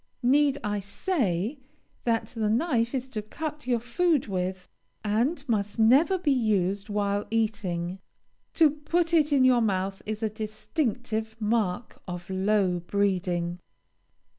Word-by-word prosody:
Need 280 +2 +4
I 210 -1 -1
say 205 - -1 0.5
that 230 -2 +1
the 220 -3 -1
knife 240 0 +1
is 260 0 -2
to 220 -5 -3
cut 300 +6 -6
your 240 -2 +2
food 300 +5 +1
with, 185 -2 -3 0.4
and 250 +9 0
must 210 -3 -1
never 270 - +5
be 330 -5 +1
used 205 -5 +1
while 205 0 0
eating? 195 -5 -1 0.6
To 315 -3 +6
put 330 +3 -1
it 305 -2 +4
in 275 -2 +4
your 250 -2 +5
mouth 195 -2 -1
is 215 +1 -3
a - - +3
distinctive 220 +1 -3
mark 215 -1 -1
of 175 0 -6
low 190 -1 +2
breeding. 180 -2 -1
220 Hz, 135 wpm, -27 LUFS, 195-265 Hz, 0.6 s, To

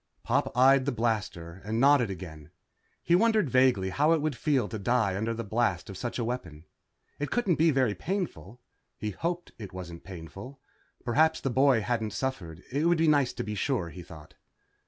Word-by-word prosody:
Pop 130 +1 0
eyed 130 +1 +5
the 140 - 0
ready - - -7
blaster 95 -6 -2
and 110 +3 -2
nodded 135 -4 +5
again. 80 -5 -8 0.5
He 170 - +1
wondered 215 - +3
vaguely 125 -8 +3
how 150 - +3
it - - +3
would 150 -2 -1
feel 135 -6 +1
to 110 - -6
die 110 -2 +1
under 110 +4 -1
the 115 - -4
blast 105 -4 -1
of - - -9
such 120 +5 -4
a 120 - -1
weapon. 90 -10 -5 0.5
It 145 - -2
couldn't 205 -9 +1
be 165 +1 +4
very 130 -7 +2
painful. 125 - -4 0.4
He 105 - -3
hoped 175 - -4
it 100 -4 -8
wasn't 85 -2 -8
painful. 95 +9 -10 0.5
Perhaps 160 +6 +3
the 135 - -1
boy 130 -2 +4
hadn't 110 -2 -2
suffered. 95 -10 -4
It 145 +5 0
would 170 0 +4
be 160 0 +2
nice 145 -4 +3
to - - -4
be 105 - -4
sure, 105 -3 -1
he 90 - -9
thought. 80 -3 -13
120 Hz, 195 wpm, -28 LUFS, 95-140 Hz, 0.5 s, eyed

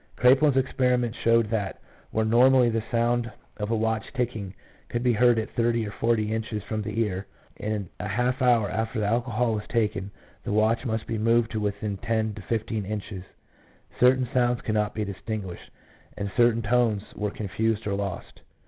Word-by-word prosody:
Kraepelin's 135 +2 +5
experiments 125 -3 +1
showed 115 -1 +3
that 105 -4 -2 0.3
where 110 0 0
normally 125 +2 +5
the 115 0 0
sound 120 0 +1 0.3
of 105 -1 -3
a 115 - +1
watch 110 0 -1
ticking 110 -6 -3 0.3
could 120 0 -2
be 125 -1 +3
heard 120 +1 +4
at 110 - -2
thirty 115 -1 +1
or - - -6
forty 110 -1 0
inches 110 -2 -3
from 110 0 -3
the 110 +2 -3
ear, 100 -3 -2 0.3
in 105 -2 -3
a 105 - -3
half 125 +5 0
hour 120 -4 +4
after 110 +3 -2
alcohol 115 +2 +1
was 105 -1 -4
taken 105 -4 0 0.3
the - - -3
watch 110 +4 +2
must 110 -1 -2
be 115 - -3
moved 115 +1 +2
to 110 - -2
within 105 0 -2
ten 110 -1 -1
to 105 - -9
fifteen 110 0 -2
inches. 100 -2 -5 0.8
Certain 130 0 +4
sounds 120 -1 +2
could 110 - -2
not 105 -1 0
be 105 -1 -1
distinguished, 100 -1 -6 0.5
and 100 -1 -3
certain 120 -2 +3
tones 110 -2 +2
were 105 0 -2
confused 110 +2 -2
or 100 - -1
lost. 100 -3 -5
110 Hz, 175 wpm, -26 LUFS, 105-120 Hz, 0.8 s, Kraepelin's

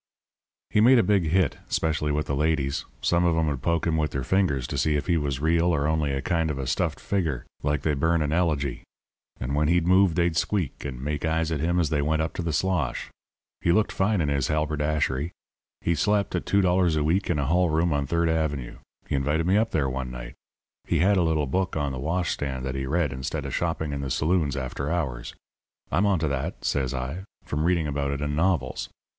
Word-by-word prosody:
"He 105 - +4
made 125 +3 +7
a 115 - +5
big 100 -4 +2
hit, 85 -1 +1
'specially 75 -2 0
with 75 +1 0
the - - -2
ladies. 70 -2 0 0.2
Some 85 0 +2
of 85 -2 +2
'em 80 - +2
would 70 -4 -2
poke 85 +3 0
him 80 -2 +1
with 75 -1 +1
their 70 - -3
fingers 75 -4 +1
to - - -3
see 75 -1 +2
if 75 - -1
he 85 - +2
was 70 -4 -1
real 85 +3 +2
or 80 -4 +2
only 80 -2 +1
a 70 0 -2
kind 80 -2 0
of 75 - -2
a 70 - -3
stuffed 65 0 -1
figure 80 -11 -2 0.2
like 75 -1 -1
they 75 - +1
burn 80 +3 +2
in 75 - -2
elegy. 75 -7 0 0.6
And 60 +3 -3
when 75 +1 +2
he'd 85 +1 +2
move 95 -1 +4
they'd 85 -1 +1
squeak, 85 -2 -1
and 65 -3 -5
make 75 0 -2
eyes 80 0 0
at 80 - -1
him 85 +4 +1
as 80 -5 +1
they 75 -2 +1
went 80 +2 +1
up 80 - -3
to - - -4
the 85 -1 -2
slosh. 80 -2 -1 0.5
He 85 - +2
looked 105 +4 +2
fine 95 0 +1
in 75 - 0
his 70 -2 0
halberdashery. 75 -1 0 0.5
He 85 - +1
slept 100 +4 +1
at - - -2
$2 90 -4 +3
a 75 - +1
week 90 +6 +1
in 85 - +1
a 70 - 0
hall 90 +4 +2
room 80 +1 +1
on 70 -1 -1
Third 85 +2 +1
Avenue. 80 -6 -1 0.3
He - - -4
invited 75 +4 +1
me 95 +3 +3
up 110 +2 +2
there 75 -8 0
one 65 -1 -3
night. - - -8 0.5
He - - +1
had 100 +3 +3
a - - +4
little 80 -3 +1
book 95 +7 -1
on 70 -2 -1
the 65 - -5
washstand 70 -4 -2
that 65 - -2
he 65 0 -3
read 75 -1 0
instead 65 0 -4
of - - -5
shopping 80 -3 -1
in 70 - -3
the 70 - -3
saloons 75 0 +1
after 70 +2 -3
hours. 70 -9 -3 0.6
'I'm 95 +7 +2
on 100 -2 +3
to 80 -1 0
that,' 70 -2 -3
says 65 -3 0
I, 65 +9 -4 0.2
'from 75 +2 -1
reading 85 -2 +2
about 70 -1 -1
it 70 0 -2
in 75 0 -1
novels. 80 -6 0
80 Hz, 230 wpm, -26 LUFS, 70-85 Hz, 0.6 s, made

